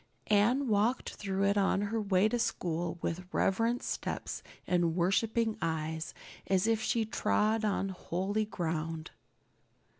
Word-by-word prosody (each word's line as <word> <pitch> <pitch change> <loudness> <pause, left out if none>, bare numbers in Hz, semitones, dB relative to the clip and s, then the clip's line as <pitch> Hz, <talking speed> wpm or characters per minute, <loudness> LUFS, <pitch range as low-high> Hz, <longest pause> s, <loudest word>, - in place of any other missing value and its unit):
Anne 240 +7 +4
walked 220 +4 +1
through 195 -1 -2
it 200 +1 +3
on 195 0 +2
her 220 +2 -1
way 200 0 +3
to 240 +2 -1
school 175 -6 -1
with 180 +2 -3
reverent 230 +5 +1
steps - - -3 0.2
and 175 -2 +2
worshiping 220 +5 +1
eyes, 160 0 -2 0.3
as 190 0 +2
if 225 -1 +2
she 225 0 +1
trod 220 0 +1
on 200 -2 0
holy 190 +3 -1
ground. 165 -4 -3
195 Hz, 130 wpm, -31 LUFS, 175-220 Hz, 0.3 s, Anne